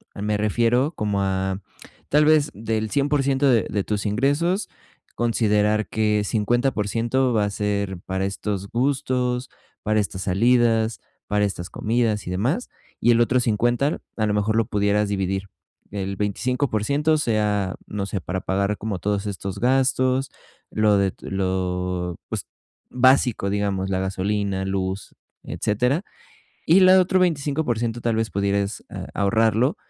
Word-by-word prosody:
Me 105 +1 -1
refiero 120 - +1
como 105 -4 -1
a 95 0 -1 0.5
tal 150 +1 +4
vez, 155 -1 +4
del 110 0 -2
100% 140 -1 +2
de 120 -4 +3
de 100 -2 -1
tus 105 +1 -2
ingresos, 145 - +1 0.5
considerar 110 -2 +1
que 105 -1 +1
50% 120 +3 0
va 110 -2 +2
a - - -1
ser 100 -2 -2
para 95 0 -2
estos 100 0 -3
gustos, 125 -1 0 0.3
para 110 0 +2
estas 100 -2 -3
salidas, 115 +2 +2 0.3
para 105 0 +1
estas 90 -3 -4
comidas 110 -2 0
y - - -3
demás. 125 - -1 0.3
Y 120 - +5
el 115 - +4
otro 125 +2 +3
50, 120 +5 +1 0.2
a 110 - +1
lo 105 - 0
mejor 105 +1 +1
lo 115 -1 +2
pudieras 105 0 +1
dividir, 95 -1 -2 0.4
el 100 -1 -3
25% 125 +7 0
sea, 105 -7 0
no 100 -1 -3
sé, 100 -1 -4
para 95 +2 -3
pagar 100 +2 -1
como 100 -3 -4
todos 100 +2 -1
estos 100 -1 -5
gastos, 130 +1 +2 0.4
lo 110 -1 +3
de 100 -1 +2
t - - -11
lo 90 -2 -2
pues, - - -4 0.4
básico, 125 -5 +3
digamos, 100 -1 -1
la 95 -1 0
gasolina, 95 +1 -1
luz, 95 0 -3 0.3
etcétera. 125 - 0 0.6
Y 170 +4 +6
la 185 0 +7
otro 185 +1 +2
25% 140 -8 0
tal 115 -2 0
vez, 110 -2 -1
pudieres 100 +2 -1
a - - -6
ahorrarlo 110 +6 +2
105 Hz, 140 wpm, -23 LUFS, 100-125 Hz, 0.6 s, la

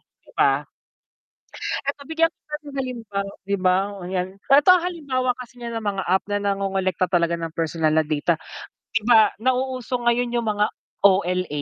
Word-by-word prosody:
di - - -26
ba? - - +2 1.2
'Eto 280 0 -2
bigyan 325 +3 +2
kita 300 -2 -8
ng 280 - -9
halimbawa 235 -6 -3 0.3
di 200 - +1
ba, 185 -1 +3 0.3
'yan. 180 0 -2 0.2
'Eto 285 +4 +6
ang 345 - 0
halimbawa 280 -8 -1
kasi 245 0 -11
niya 235 -1 -4
ng 220 - -10
mga 190 - -2
app 185 +2 +1
na 205 0 0
nangongolekta 195 -2 0
talaga 170 -2 +1
ng 165 -1 -5
personal 160 -1 0
na 160 - +4
data. 155 +2 0 0.6
Di 225 - +2
ba 220 -2 +6
nauuso 255 0 0
ngayon 240 0 +1
yung 230 - -4
mga 210 0 +2 0.4
OLA, 185 -5 +2
210 Hz, 165 wpm, -23 LUFS, 185-255 Hz, 1.2 s, Eto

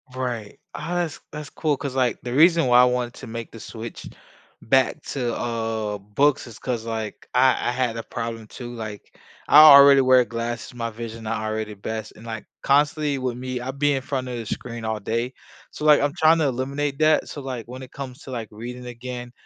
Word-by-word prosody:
Right, 120 -5 -4 0.2
as 170 0 -2
t - - -37
that's 150 -1 -7
cool 150 -3 -1
'cause, 135 -1 -5
like, 125 -3 +1
the 120 0 -5
reason 165 +1 +5
why 125 0 +7
I - - +7
wanted 125 -1 -1
to 135 - -10
make 115 0 -6
the 115 - -11
switch 115 +1 -8 0.5
back 130 +5 +2
to, 125 -4 -2
uh, 110 -3 -2
books 125 +9 +1
is 115 -3 -12
'cause, 120 -3 -3
like, 110 -2 -5
I 130 0 +3
I - - +1
had 125 -2 -1
a 115 - -4
problem, 115 -1 -5
too, 120 +2 -8
like, 110 -3 -8 0.3
I 150 - +8
already 140 -2 +9
wear 130 -1 +5
glasses, 120 +1 -5
my 115 -1 -3
vision 115 0 -8
not 110 0 -2
already 110 0 -3
best, 110 +2 -6
and, 110 - -14
like, 110 -1 -6 0.2
constantly 145 +1 +2
with 125 -2 -3
me, 130 0 -4
I 130 - -3
be 145 +1 +1
in 135 - -1
front 130 -1 -3
of 125 -1 -4
the 115 - -5
screen 115 +1 -5
all 110 -1 -2
day, 115 +5 -2 0.4
so, 150 - -6
like, 150 -1 +6
I'm 145 0 +1
tryna 160 -2 +4
eliminate 140 +3 -2
that, 155 0 +3
so, 145 - -7
like, 130 -4 -5
when 130 +2 -8
it 130 - -10
comes 130 -3 -8
to, 135 - -9
like, 115 -4 -5
reading 125 +3 -8
again, 125 0 -7
125 Hz, 210 wpm, -23 LUFS, 115-140 Hz, 0.5 s, already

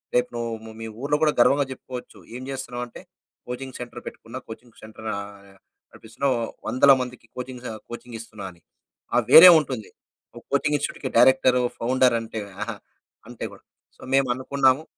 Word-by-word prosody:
రేపు 125 0 +2
నువ్వు 115 -1 -5
మీ 115 - -5
ఊర్లో 145 +1 +1
కూడా 150 - +4
గర్వంగా 140 +3 +5
చెప్పుకోవచ్చు. 125 -1 -9 0.2
ఏం 130 - -7
చేస్తున్నావ్ 125 -2 -4
అంటే, - - -12 0.5
కోచింగ్ 130 +1 -6
సెంటర్ 120 0 -8
పెట్టుకున్న, 120 +3 -9
కోచింగ్ 115 +1 -12
సెంటర్ 110 0 -10
ఆహ్, 100 -1 -10 0.3
నడిపిస్తున్నా. 115 +5 -4 0.4
100ల 135 +2 +5
మందికి 125 -2 -7
కోచింగ్ 125 0 -7
స - - -3 0.2
కోచింగ్ 120 -1 -8
ఇస్తున్నా 110 -3 -9
అని. 85 - -22 0.5
ఆ! - - +5
వేరే 180 +3 +12
ఉంటుంది. 130 -7 -5 0.5
ఒక - - -11
కోచింగ్ 150 +1 +2
ఇన్‌స్టిట్యూట్‌కి 135 -1 -4
డైరెక్టరు, 125 0 +5 0.2
ఫౌండర్ 125 0 +3
అంటే. 110 -1 -6 0.2
ఆహా! 115 0 -5 0.5
అంటే - - -6
కూడా. - - -16 0.3
సో, - - -21
మేము 135 -1 +4
అనుకున్నాము 135 +2 +2
125 Hz, 155 wpm, -24 LUFS, 115-130 Hz, 0.5 s, వేరే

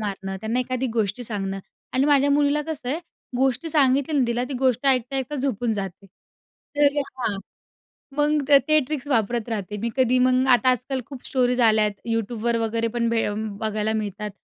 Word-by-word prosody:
मारणं, 195 -2 -4
त्यांना 220 +4 -1
एखादी 255 +1 -2
गोष्टी 220 +1 -1
सांगणं 195 -3 -3 0.3
आणि 260 +1 +2
माझ्या 285 -1 +4
मुलीला 290 +1 +3
कसं 300 -6 -5
आहे 295 +6 0 0.4
गोष्ट 265 +3 +1
सांगितली 285 -1 +2
ना 255 - +4
तिला, 235 +1 0
ती 270 +2 -5
गोष्ट 260 0 +1
ऐकता-ऐकता 265 +2 +1
झोपून 245 -4 -1
जाते. 195 -1 -5 0.7
तर 290 0 +3
हां, 255 -7 -2 0.8
मग 295 -1 +1 0.2
ते 310 - +5
ट्रिक्स 295 -2 -4
वापरत 235 -2 0
राहते 210 -2 -4
मी 235 - -1
कधी. 255 -1 +3
मग 255 +1 +3
आता 255 +1 +5
आजकाल 255 +1 -1
खूप 270 -3 -10
स्टोरीज 250 -1 +1
आल्यात 215 -2 +4 0.2
YouTubeवर 230 +1 -1
वगैरे 230 +1 0
पण 235 -1 +1
बे 230 -1 +1
अ, 205 - -2
बघायला 215 0 -2
मिळतात. 210 -1 -3
245 Hz, 170 wpm, -23 LUFS, 220-270 Hz, 0.8 s, ते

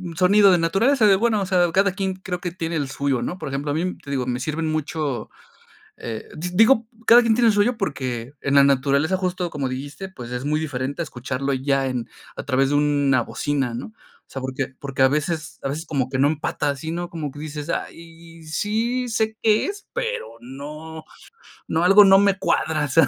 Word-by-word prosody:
sonido 195 +3 +5
de - - +5
naturaleza 215 +10 +3
de, 195 - +6
bueno, 220 -1 +1
o - - -1
sea, 180 -2 +2
cada 195 +2 +3
quien 190 -1 -2
creo 185 -1 -5
que 175 - -3
tiene 165 -1 -3
el 145 -3 -1
suyo, 140 -2 -1
¿no? 175 +9 -3
Por 155 - -5
ejemplo, 140 +2 -3
a - - 0
mí, 180 +3 -2
te - - -13
digo, 130 -3 -1
me 125 0 -1
sirven 155 +2 -2
mucho, 150 -5 -3 0.7
eh, 115 -2 -6
di 175 +3 -4
digo, 225 +2 +5 0.2
cada 240 +1 +9
quien 230 -2 +2
tiene 235 0 +4
el - - +3
suyo, 210 +4 +2
porque 130 - -3
en 140 0 0
la 140 - +8
naturaleza 140 +5 +2
justo, 180 -1 -2
como 140 -3 -2
dijiste, 145 +9 -6
pues, 125 -10 -10
es 125 +1 -4
muy 150 +1 +1
diferente 140 0 -3
a - - 0
escucharlo 135 -1 -3
ya 135 +1 0
en 125 -3 -3 0.3
a - - -6
través 135 0 +2
de 145 - +1
una 145 -3 +2
bocina, 135 -1 -2
¿no? - - -5
O 220 - -24
sea, 135 - -5
porque 130 +1 -3
porque 135 -1 -4
a - - +7
veces 155 +2 -2
a 135 - -1
veces 155 +4 -4
como 135 -5 -1
que 135 - -2
no 140 - +5
empata 150 -1 -1
así, 145 +3 -4
¿no? 175 +1 -4
Como 155 -4 -5
que 145 - -11
dices: 150 0 -6
"Ay, 165 0 -7
sí 225 +10 -1
sé 220 -1 -1
qué 215 -1 +3
es, 405 0 -7
pero 485 -1 -2 0.2
no 150 +5 -9 0.6
no, 160 - 0
algo 195 +3 +8
no 195 0 +7
me 200 -1 +3
cuadra", 155 -1 0
o - - -3
sea. 165 +5 +5
155 Hz, 220 wpm, -22 LUFS, 140-190 Hz, 0.7 s, cada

